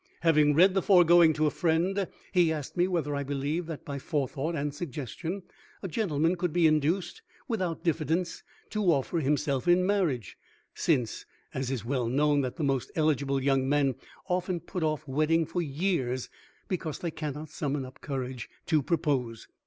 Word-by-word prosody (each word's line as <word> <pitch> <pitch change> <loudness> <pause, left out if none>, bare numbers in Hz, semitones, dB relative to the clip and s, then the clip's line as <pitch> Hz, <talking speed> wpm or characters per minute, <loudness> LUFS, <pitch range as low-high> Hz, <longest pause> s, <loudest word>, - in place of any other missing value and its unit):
Having 150 -3 +4
read 185 +4 +6
the 190 - +2
foregoing 175 -3 +6
to 155 +1 +1
a 150 - +2
friend 180 +4 +1 0.2
he 175 -3 +4
asked 150 -3 -4
me 175 0 +3
whether 165 -6 -1
I 140 - -1
believed 145 +4 -2
that 160 -3 -7
by 140 -1 -4
Forethought 145 +3 -2
and 145 -1 -2
Suggestion 160 - -5 0.4
a - - -2
gentleman 165 -4 +1
could 175 -1 -1
be 175 +1 +3
induced 160 - +1 0.3
without 185 - -2
diffidence 165 +1 0 0.3
to 215 -1 -1
offer 165 0 +2
himself 145 -1 0
in 180 +1 +5
marriage, 170 - 0 0.3
since, 125 -9 0 0.3
as 130 -1 -2
is 130 -4 -3
well 125 -1 0
known, 145 +3 +3
that 130 -2 -3
the 165 - -3
most 135 -3 0
eligible 140 -3 +1
young 135 -1 +2
men 140 -2 +3 0.3
often 180 -1 -1
put 180 +1 -6
off 155 -1 -1
wedding 155 +4 +2
for 175 - -2
years 140 -5 -1 0.4
because 165 -5 -3
they 170 - -3
cannot 150 0 -5
summon 145 -3 -2
up 130 - -13
courage 130 -4 -4 0.2
to 155 -2 +2
propose. 135 -7 -1
155 Hz, 170 wpm, -29 LUFS, 140-175 Hz, 0.4 s, read